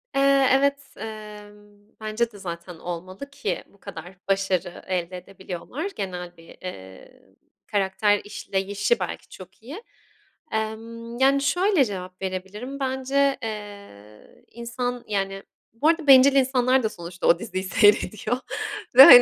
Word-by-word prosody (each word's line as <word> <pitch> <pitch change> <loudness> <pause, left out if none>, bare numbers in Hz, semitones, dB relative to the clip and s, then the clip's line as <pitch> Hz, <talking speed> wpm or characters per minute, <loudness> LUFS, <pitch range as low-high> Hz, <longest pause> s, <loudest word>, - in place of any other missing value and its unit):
Eee, 275 -1 +5
evet, 280 +1 +3 0.2
emm, 210 -1 -10 0.2
bence 220 +2 -1
de, 205 - -13
zaten, 170 -1 -6
olmalı 185 +10 -7
ki 210 -10 -3
bu 200 - -24
kadar 190 -2 -9
başarı 195 -3 0
elde 180 -1 -2
edebiliyorlar, 195 - -6
genel 180 -3 -5
bir, 165 - -16
eee, 95 - -10 0.5
karakter 205 +1 +2
işleyişi, 200 +1 -1
belki, 180 - -5
çok 185 +3 -13
iyi. 310 - -8 0.7
Emm, 230 +2 -4
yani, 275 +1 +4
şöyle 355 +1 +3
cevap 185 -2 -7
verebilirim. 195 +9 -5
Bence, 270 +1 +1
eee, 200 - -9
insan, 245 +1 -4
yani, 195 -1 -2 0.3
bu 285 +7 0
arada, 325 -2 +2
bencil 270 +1 +8
insanlar 260 -1 +3
da 220 - +1
sonuçta 175 -1 -5
o 170 - +5
diziyi 185 +1 -4
seyrediyor 215 +3 +3 0.6
ve, 265 - +13
hani, 245 -3 +12
210 Hz, 130 wpm, -25 LUFS, 185-255 Hz, 0.7 s, ve